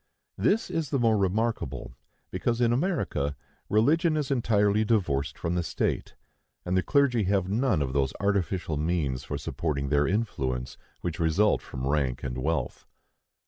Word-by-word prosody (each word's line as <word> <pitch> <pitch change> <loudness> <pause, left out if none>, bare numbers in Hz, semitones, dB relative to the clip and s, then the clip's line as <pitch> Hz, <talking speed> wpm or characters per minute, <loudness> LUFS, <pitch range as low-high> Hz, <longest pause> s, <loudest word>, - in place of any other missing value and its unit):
This 215 -3 +1
is 165 -5 -1
the 140 - +1
more 115 -3 +3
remarkable, 100 - -1 0.4
because 120 -1 -1
in 120 -1 +3
America 120 - -1 0.3
religion 155 - +3
is 145 -2 -2
entirely 105 -4 +2
divorced 90 -11 0
from 85 - -2
the 90 - +1
state, 85 - -2 0.5
and 90 - 0
the 95 - +4
clergy 130 -4 +2
have 95 -1 +1
none 105 - +1
of 65 -1 -4
those 65 -2 +1
artificial 95 -5 0
means 75 -5 -1
for - - -4
supporting 70 -4 -2
their 75 0 +3
influence 70 - -2 0.3
which 85 -1 -3
result 85 +6 +3
from 65 0 -6
rank 70 -3 0
and 65 -1 -3
wealth. 75 -2 -2
95 Hz, 150 wpm, -27 LUFS, 70-115 Hz, 0.5 s, the